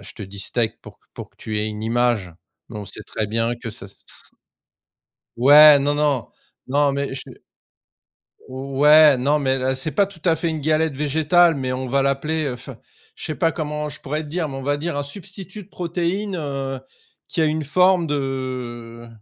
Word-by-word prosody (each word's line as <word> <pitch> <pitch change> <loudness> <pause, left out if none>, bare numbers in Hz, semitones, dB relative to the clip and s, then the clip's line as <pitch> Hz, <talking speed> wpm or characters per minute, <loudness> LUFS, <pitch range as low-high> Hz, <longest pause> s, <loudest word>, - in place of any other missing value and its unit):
je - - -11
te 110 - -9
dis 100 +1 -11
«steak» 115 -1 -2
pour - - -13 0.2
pour - - -9
que - - -37
tu 110 -1 -5
aies 105 - -1
une 105 0 -6
image 115 -6 0 0.3
mais 110 - -9
on 105 - -6
sait - - -9
très 110 - -3
bien 115 +2 0
que 120 -1 -7
ça 100 -3 -10
ç 95 - -17
ç - - -15 1.1
Ouais, 145 +4 +8
non, 145 +1 0
non, 145 -5 0 0.4
non, 140 +1 +2
mais 140 -1 -3
je 135 - -5 1.3
ouais 140 +3 +5
non, 145 +4 +2
mais 135 -2 0
l 130 +1 0
c'est 135 +4 -4
pas 195 +7 +2
tout 190 -5 -15
à 165 -2 +4
fait 165 +1 -2
une 160 -1 -3
galette 155 0 +1
végétale, 160 +4 +3
mais 130 -2 -3
on 130 +1 -3
va 135 +2 +1
l'appeler, 150 +3 -1
heu, 135 - -2
enfin, 125 +1 -10 0.4
je - - -8
sais 155 - -3
pas 165 -2 +1
comment 150 -1 -4
je - - -10
pourrais 150 +3 -3
te - - -10
dire, 160 0 -2
mais 135 - -6
on 135 - -6
va 145 +1 0
dire 155 0 -3
un 145 - -1
substitut 195 +5 -9
de 185 - -22
protéine, 180 +3 -2
heu, 135 -4 -4 0.5
qui 165 - -2
a 160 - +4
une 155 0 0
forme 180 +3 +3
de 130 -4 -4
145 Hz, 205 wpm, -21 LUFS, 130-155 Hz, 1.3 s, Ouais